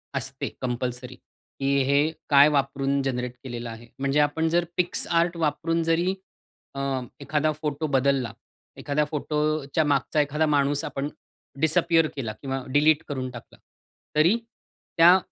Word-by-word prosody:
असते 135 0 -2
कंपल्सरी, 125 0 -3
की 135 +2 -7
हे 140 +3 +2 0.2
काय 140 0 +8
वापरून 140 -1 0
जनरेट 125 -2 -2
केलेलं 120 -2 -6
आहे. 115 +1 -10
म्हणजे 140 +2 +1
आपण 150 +2 +2
जर 170 +1 +2 0.2
PicsArt 170 0 0
वापरून 165 +1 0
जरी 165 +3 +1 0.6
अ, - - -4 0.4
एखादा 155 +2 +1
फोटो 150 0 -2
बदलला, 135 -1 +1 0.4
एखादा 145 +1 0
फोटोच्या 150 0 -1
मागचा 145 +1 +2
एखादा 150 +2 0
माणूस 145 -1 +1
आपण 140 +1 -3 0.5
डिसअपियर 165 +1 +3
केला 115 -6 -4
किंवा 135 -1 -3
डिलीट 150 +1 +4
करून 130 -3 -3
टाकला, 120 - -12 0.6
तरी 165 +9 +4 0.6
त्या 175 +3 +8
145 Hz, 130 wpm, -25 LUFS, 135-155 Hz, 0.6 s, काय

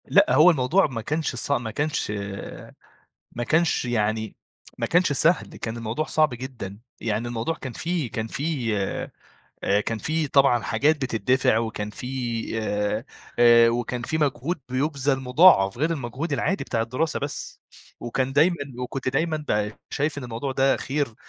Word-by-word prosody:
لأ - - +4
هو 155 +6 +8
الموضوع 155 +6 +2
ما 125 -5 -5
كانش 150 +2 -2
ص 125 - -3
ما 120 -5 0
كانش 150 -1 -1 1.2
ما 120 - -4
كانش 160 +1 +2
يعني 110 -2 -1 0.4
ما - - -1
كانش 175 -2 +3
سهل، 165 +3 +2
كان 115 +1 -5
الموضوع 115 +6 -2
صعب 155 -4 +2
جدًا، 120 -6 -7 0.2
يعني 110 +1 -1
الموضوع 120 +7 -2
كان 130 -6 -7
في 165 -4 -2
كان 110 0 -3
في 135 -5 -2 0.9
آآ 100 +1 +3
كان 115 +1 -3
في 155 +5 -1
طبعًا 135 -4 +4
حاجات 155 +2 +2
بتتدفع، 130 -2 +1
وكان 110 -2 -3
في 115 - -8 0.6
آآ، 105 +1 -1 0.3
آآ 120 -1 +7
وكان 120 +1 -2
في 155 +6 -2
مجهود 150 +3 -1
بيُبذَل 140 +1 0
مضاعَف، 125 - +5
غير 155 +4 +1
المجهود 145 +1 -3
العادي 185 +7 0
بتاع 115 - -1
الدراسة 130 +8 -2
بس، 140 0 -5 0.4
وكان 130 +2 -2
دايمًا 165 +5 +4 0.2
وكنت 125 +1 -3
دايمًا 155 +3 -1
ب 105 0 0 0.2
شايف 145 +1 -1
إن 135 - -6
الموضوع 120 +3 -4
ده 135 +1 +3
خير، 140 -4 -2
130 Hz, 155 wpm, -24 LUFS, 115-150 Hz, 1.2 s, هو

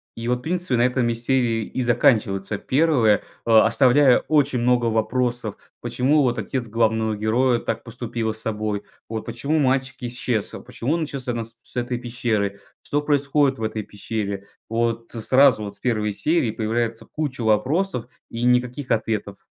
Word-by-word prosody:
И 115 0 -5
вот 125 0 0
принципе 175 -3 -1
на 120 - +2
этом 125 -1 +1
и - - +1
серии 120 -1 0
и 130 - -3
заканчивается 105 -4 +2
первое. 130 -6 +3 0.2
А 110 -1 +6
оставляя 130 +2 +5
очень 145 -5 +2
много 120 0 +2
вопросов: 120 0 -1 0.3
почему 125 +5 +2
вот 120 -2 0
отец 120 +3 -3
главного 110 0 +1
героя 115 +3 +2
так 115 0 -3
поступила 115 -1 -3
с 110 - -10
собой, 105 -2 -2 0.3
вот 110 -1 -5
почему 140 +7 -1
мальчик 130 -1 +1
исчез, 120 -3 -2
почему 125 +4 -2
он 165 -1 0
исчез 140 -4 -5
именно 120 -2 -1
с 115 +1 -9
с - - -12
этой 120 0 -2
пещеры, 115 -5 -2 0.2
что 145 - -1
происходит 140 -2 +2
в - - -4
этой 110 0 -2
пещере. 100 -1 -5 0.2
Вот 115 0 -1
сразу 130 +1 +4
вот 100 - -7
с - - -15
1 105 -4 0
серии 150 +2 +1
появляется 115 +1 -2
куча 145 -5 -4
вопросов 125 - +1 0.3
и 115 +1 -4
никаких 125 +2 +1
ответов. 110 -3 -2
120 Hz, 165 wpm, -23 LUFS, 110-130 Hz, 0.3 s, А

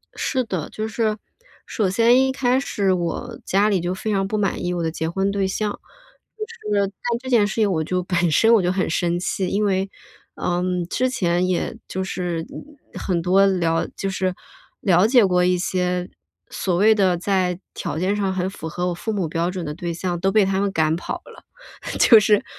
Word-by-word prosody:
是 255 -1 -1
的， 185 -8 -4
就 215 0 -4
是 220 -1 -1 0.5
首 200 -4 -1
先 235 +6 +4
一 265 - 0
开 260 -1 +1
始 200 -8 0
我 180 +7 -3
家 205 +3 +2
里 195 -3 +2
就 175 +1 -2
非 215 +3 -3
常 195 -1 0
不 215 - -2
满 200 -2 -1
意 180 0 -1
我 175 - -2
的 160 - 0
结 160 0 -3
婚 195 +3 0
对 195 -1 0
象， 210 +2 -2 0.6
就 430 - -4 0.3
是 200 - +2
在 195 - -11 0.3
这 260 0 -8
件 225 -5 +4
事 - - -5
情 215 -3 +2
我 160 -2 0
就 180 +3 -1
本 175 -2 +1
身 225 +8 +5
我 215 - +5
就 180 0 +1
很 185 -2 -1
生 175 +1 0
气。 185 +1 -2
因 205 +2 0
为， 195 0 0 0.5
嗯， 180 0 -1
之 255 +8 0
前 180 -6 +1
也 180 -2 -1
就 190 0 -3
是 175 -3 -3 0.5
很 175 -3 -1
多 190 +3 +4
了 170 -4 +1
就 195 - -3
是 185 -1 -1 0.5
了 185 0 +4
解 240 -4 +5
过 180 -1 +2
一 180 0 +3
些 180 0 -1 0.4
所 180 -3 -1
谓 215 +3 +5
的 185 -4 +2
在 185 -1 0
条 - - -4
件 195 +3 +1
上 195 -2 -1
很 185 0 -1
符 160 -4 -7
合 180 +2 -2
我 175 - -1
父 220 +6 -4
母 190 -6 -1
标 170 +3 -1
准 180 -3 -5
的 150 - -4
对 170 +1 -4
象 175 0 -3
都 195 +2 +1
被 210 -2 +4
他 190 0 0
们 200 -1 0
赶 160 -2 +1
跑 175 - -5
了。 - - -14 0.6
就 225 -3 +8
是 210 0 +3
190 Hz, 225 characters per minute, -22 LUFS, 175-205 Hz, 0.6 s, 就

